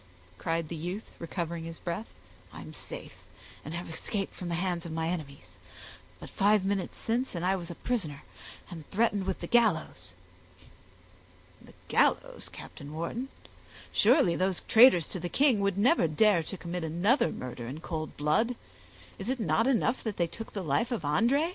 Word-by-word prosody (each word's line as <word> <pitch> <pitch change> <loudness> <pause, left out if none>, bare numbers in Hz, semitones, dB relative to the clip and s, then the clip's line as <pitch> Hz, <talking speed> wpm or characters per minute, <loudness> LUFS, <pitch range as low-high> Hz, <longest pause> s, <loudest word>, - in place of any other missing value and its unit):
cried 165 -1 -1
the 170 - -5
youth, 180 +7 -5
recovering 170 -1 -4
his 165 0 -7
breath, 175 +6 -4 0.4
"I - - -9
am - - -10
safe, - - -8 0.5
and 155 - -6
have 175 - -5
escaped 195 +4 -3
from 180 - -6
the 170 - 0
hands 175 -1 -1
of 170 - -6
my 160 0 -1
enemies; 140 - -6 0.6
but - - -9
five 205 0 +3
minutes 195 -2 -1
since 235 0 -1
and 170 +1 -2
I 190 +1 +3
was 175 -2 -5
a 170 - -6
prisoner, 160 - -2 0.5
and 165 -4 -9
threatened 205 -2 +1
with 190 - -2
the - - -3
gallows." 170 - +1 1.5
"The - - -16
gallows, - - +1
Captain 145 +2 -10
Wharton! 230 +11 -3 0.6
surely 220 - +4
those 185 0 0
traitors 225 - +7
to 185 - -4
the 175 +1 -4
king 265 - +4
would 200 -1 +1
never 235 - +4
dare 175 +3 +4
to 190 +4 -6
commit 175 0 -4
another 175 - +2
murder 125 -2 -6
in 140 +6 -6
cold 160 -2 -5
blood; 155 +12 +2 0.6
is 195 +4 -4
it 260 0 0
not 225 +2 +2
enough 255 -1 +2
that 220 -3 -3
they 170 - +2
took 225 +7 -8
the 195 - -3
life 165 - +1
of 230 -9 -2
André? 235 - +2
180 Hz, 175 wpm, -30 LUFS, 165-220 Hz, 1.5 s, traitors